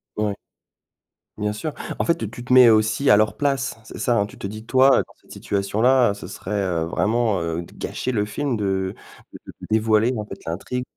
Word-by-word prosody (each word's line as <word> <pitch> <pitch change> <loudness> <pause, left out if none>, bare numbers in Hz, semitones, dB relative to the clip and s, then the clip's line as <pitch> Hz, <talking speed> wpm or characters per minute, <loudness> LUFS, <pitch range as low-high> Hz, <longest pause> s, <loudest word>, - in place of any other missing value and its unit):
Ouais. 105 -1 -1 1.0
Bien 105 0 0
sûr, 125 +9 -5 0.2
en - - -1
fait, 170 - +1
heu, 110 - -3
tu 120 +2 -10
te 125 - 0
mets 125 -2 +9
aussi 110 +5 +2
à 105 - +7
leur 105 -2 +2
place, 135 -2 -1
c'est - - -10
ça, 120 +2 +1
hein? 100 - 0
Tu - - -15
te - - -7
dis 110 +3 -7
toi, 130 +2 +5
dans - - -20
cette - - -21
situation-là, 110 +5 +2
heu, - - -3
ce 100 - -9
serait 95 -4 -2
vraiment, 110 +3 0
heu, 85 +1 -3
gâcher 130 - -4
le 105 -4 0
film 130 +5 -2
de, 95 -3 -1 0.4
de - - -10
de - - -11
dévoiler 110 +2 +3
en 105 -2 -4
fait 100 -1 -11
l'intrigue. 100 +9 -4
110 Hz, 210 wpm, -22 LUFS, 100-125 Hz, 1.0 s, mets